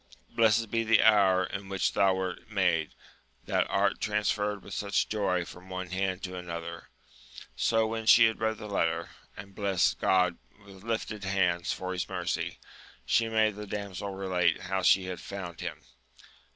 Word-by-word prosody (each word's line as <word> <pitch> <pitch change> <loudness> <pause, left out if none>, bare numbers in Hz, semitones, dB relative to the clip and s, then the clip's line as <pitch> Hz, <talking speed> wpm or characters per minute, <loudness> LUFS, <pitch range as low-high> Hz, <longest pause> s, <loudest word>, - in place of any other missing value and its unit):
Blessed 115 -1 +3
be 115 0 +1
the 115 -1 +4
hour 100 -4 +5
in 95 +1 -6
which 95 -2 0
thou 95 -1 +3
wert 95 +1 -4
made, 90 -7 +1 0.5
that - - 0
art - - +1
transferred 105 -1 -1
with - - -9
such 100 -1 0
joy 95 -4 0
from 90 +2 -12
one 95 -1 -5
hand 95 0 -2
to 90 -1 -5
another! 85 -2 -7 0.7
So 115 -1 +2
when 110 0 -4
she 115 0 +8
had 110 0 0
read 110 0 0
the 105 - -8
letter, 85 -6 -1 0.3
and 100 +1 -10
blest 95 -3 +1
God 90 -2 +2 0.3
with 95 -1 -14
lifted 110 -2 -3
hands 90 -3 +1
for 95 0 -4
his 90 - -3
mercy, - - -3 0.5
she 115 -1 +2
made 110 -2 +2
the 105 0 -7
damsel 100 -1 -5
relate 90 -3 +1
how 95 +1 -2
she 95 +1 +5
had 90 -1 -5
found 90 -4 -7
him. - - -6
95 Hz, 165 wpm, -29 LUFS, 90-105 Hz, 0.7 s, she